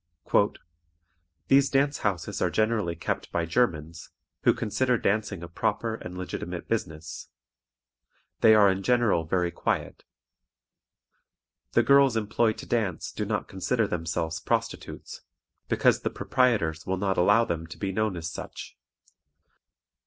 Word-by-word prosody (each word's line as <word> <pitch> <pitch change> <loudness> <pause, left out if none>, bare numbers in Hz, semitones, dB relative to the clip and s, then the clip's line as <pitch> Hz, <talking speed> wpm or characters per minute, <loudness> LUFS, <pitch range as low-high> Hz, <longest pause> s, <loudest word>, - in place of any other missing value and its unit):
"These 135 0 +5
dance 140 +1 +1
houses 95 -6 -2
are - - +2
generally 110 -6 0
kept 85 - -4
by 85 - 0
Germans, 85 -5 -1 0.3
who - - +5
consider 125 +3 0
dancing 100 -4 -1
a - - -6
proper 110 +6 -1
and 90 -5 -7
legitimate 90 - -5
business. 80 0 -4 1.1
They 110 -1 +7
are 100 -2 +6
in 95 +1 -2
general 120 -7 +2
very 90 +1 0
quiet. - - -2 1.7
The - - +4
girls 140 -4 +5
employed 110 +1 +1
to - - -8
dance 105 -8 -1
do - - -3
not - - -2
consider 110 +5 0
themselves 80 -2 -2
prostitutes, - - -3 0.5
because - - +3
the - - -1
proprietors 95 -11 0
will 95 0 0
not 95 0 0
allow 105 +6 +5
them 80 -3 -3
to 85 - -10
be 95 -1 -2
known 110 -2 -1
as 80 -1 -4
such. 85 - -8
100 Hz, 130 wpm, -27 LUFS, 85-115 Hz, 1.7 s, They